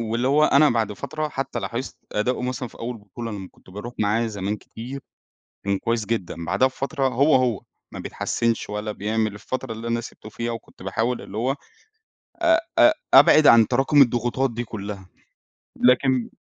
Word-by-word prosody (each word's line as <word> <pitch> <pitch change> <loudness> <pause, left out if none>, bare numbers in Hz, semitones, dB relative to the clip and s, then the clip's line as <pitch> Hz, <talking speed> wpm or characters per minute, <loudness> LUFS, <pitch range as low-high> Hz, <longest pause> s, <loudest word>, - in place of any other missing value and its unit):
واللي 115 +3 -1
هو 150 +3 +4
أنا 150 +1 +5
بعد 110 -3 0
فترة 155 +9 -4
حتى 135 -2 -4
لاحظت 120 +2 -5 0.2
أداءه 125 +4 0
مثلًا 125 0 -3
في - - -17
أول 120 +1 -4
بطولة 105 +3 -7
لما 95 -3 -7
كنت - - -21
بارُوح 105 +6 -8
معاه 110 +3 +1
زمان 105 -1 -3
كتير، 125 +6 -8 0.6
كان 100 0 0
كويس 115 -1 -1
جدًا، 90 -7 -3
بعدها 130 +10 +2
بفترة 135 +1 -2
هو، 140 +5 +3
هو 125 -5 +1 0.3
ما - - -7
بيتحسّنش 115 -2 -2
ولا 105 +1 -3
بيعمل، 110 +1 -1
الفترة 115 +4 -5
اللي 115 +1 -6
أنا 115 0 0
سِبته 115 -2 -11
فيها، 115 +2 -4
وكنت 115 - -10
باحاول 110 +6 -1
اللي 100 - -9
هو 125 +5 0 0.9
آآ، 330 -1 +5 0.2
آآ 310 0 +7 0.2
أبعِد 145 +2 +8
عن 115 -2 +7
تراكم 135 +3 +4
الضغوطات 120 +1 +2
دي 120 +1 -3
كلّها. 100 -4 -7 0.7
لكن 125 0 +3
115 Hz, 170 wpm, -23 LUFS, 105-130 Hz, 0.9 s, أبعِد